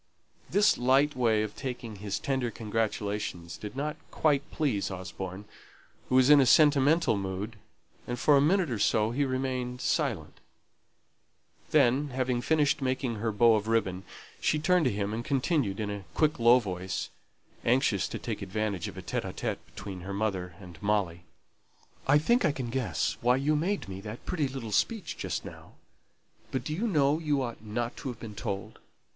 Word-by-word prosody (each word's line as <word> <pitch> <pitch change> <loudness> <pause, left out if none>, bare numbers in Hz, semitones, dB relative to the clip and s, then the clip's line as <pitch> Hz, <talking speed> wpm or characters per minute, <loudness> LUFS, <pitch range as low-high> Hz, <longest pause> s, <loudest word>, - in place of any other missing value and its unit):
This 205 +1 +4
light 135 +4 +3
way 115 -4 +2
of 105 -1 -5
taking 120 -5 -5
his 100 0 -3
tender 130 -3 -1
congratulation 105 -5 -2
did 105 +3 -7
not 150 +2 -3
quite 145 -2 +1
please 130 -11 -1
Osborne, 95 +1 -6 0.6
who 130 - +2
was 130 +2 +6
in 145 -1 +8
a - - +4
sentimental 150 +1 +5
mood, 100 +3 -4 0.5
and 120 - -3
for 145 +4 +4
a 140 - +5
minute 170 0 +2
or 115 - -2
so 110 +1 +2
he 140 +4 +1
remained 130 -1 -2
silent. - - -1 1.3
Then, 135 +5 +3
having 125 -1 -1
finished 150 0 +2
making 130 -3 -1
her 110 +1 -1
bow 115 +2 +5
of 110 0 0
ribbon, 100 -5 0 0.4
she 155 - +1
turned 175 +2 +3
to 130 - +3
him, 100 0 -2
and 115 +2 -3
continued 135 - 0
in 105 -1 -2
a 100 -1 -5
quick 155 -3 +2
low 120 +2 +7
voice, 95 -5 -3 0.5
anxious 120 -5 +2
to - - -5
take - - -5
advantage 100 -1 -2
of - - -9
a - - -7
conversation - - -3
between 95 -2 -8
her 95 +2 -6
mother 95 -4 -2
and 90 -4 -12
Molly, 100 -5 0 0.8
"I 140 +2 +6
think 235 +11 +3
I 155 - +3
can 130 -4 -5
guess 130 -3 -1
why 125 +1 +4
you 145 +3 +1
made 185 +7 0 0.2
that 110 +3 -8
pretty 155 -6 0
little 130 -5 -6
speech 200 - 0
just - - -4
now. - - -11 0.8
But 130 -2 -2
do 150 - -3
you 210 +9 -1
know 150 -5 +3
you 145 -4 0
ought 120 -3 -6
not 115 +2 -3
to - - -6
have 125 -4 -5
been 110 -2 -8
told? 100 -2 -5
120 Hz, 175 wpm, -29 LUFS, 105-140 Hz, 1.3 s, in